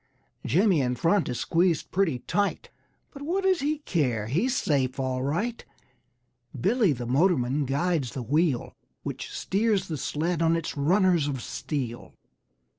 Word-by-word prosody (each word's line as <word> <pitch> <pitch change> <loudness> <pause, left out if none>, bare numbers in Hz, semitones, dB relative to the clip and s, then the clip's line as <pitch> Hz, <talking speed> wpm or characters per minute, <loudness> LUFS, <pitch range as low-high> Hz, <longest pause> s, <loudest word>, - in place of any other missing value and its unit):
Jimmy 175 - +3
in 125 -1 0
front 170 +8 +2
is 125 - -3
squeezed 170 -2 +1
pretty 180 -8 +1
tight, 200 +10 -2 0.4
But 280 - -11
what 355 +7 -1
does 380 -2 +3
he 300 +2 0
care, 135 - -1
he's 190 - 0
safe 135 - 0
all 130 -1 -1
right! 175 - -2 1.0
Billy, 230 -8 +3
the 125 -3 -3
motorman, 140 0 +2
guides 140 0 0
the 130 - -3
wheel 145 +1 0 0.3
Which - - -5
steers 205 -1 0
the 155 - -2
sled 165 +5 -1
on 165 0 +3
its 165 -1 -3
runners 175 +1 +3
of 135 -3 -2
steel. 120 -2 -5
160 Hz, 145 wpm, -26 LUFS, 130-195 Hz, 1.0 s, Jimmy